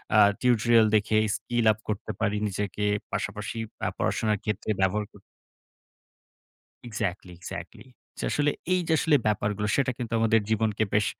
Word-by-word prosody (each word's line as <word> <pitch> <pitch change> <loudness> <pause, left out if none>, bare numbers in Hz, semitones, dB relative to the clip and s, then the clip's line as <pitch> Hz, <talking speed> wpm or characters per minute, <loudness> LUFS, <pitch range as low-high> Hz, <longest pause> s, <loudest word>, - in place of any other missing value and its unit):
আ - - +7 0.2
tutorial 120 -2 +4
দেখে 110 +1 +2 0.2
skill 120 +2 -1
up 110 - -4
করতে 105 -2 -3
পারি 105 -1 0
নিজেকে, 105 +1 -3 0.3
পাশাপাশি 105 +2 -3 0.3
আ - - +2
পড়াশোনার 105 -2 0
ক্ষেত্রে 105 0 -3
ব্যবহার 100 +3 +1
ক - - -24 1.7
Exactly, 100 -4 -3
exactly! 90 - -8 0.3
যে - - -4
আসলে 145 0 +2 0.2
এই 185 - +2
যে 160 - +2
আসলে 155 -2 +3
ব্যাপারগুলো, 105 0 0
সেটা 135 -2 +1
কিন্তু 115 -2 -5
আমাদের 115 0 +4
জীবনকে 110 -1 +1
বেশ 105 0 +3
110 Hz, 145 wpm, -27 LUFS, 105-115 Hz, 1.7 s, আ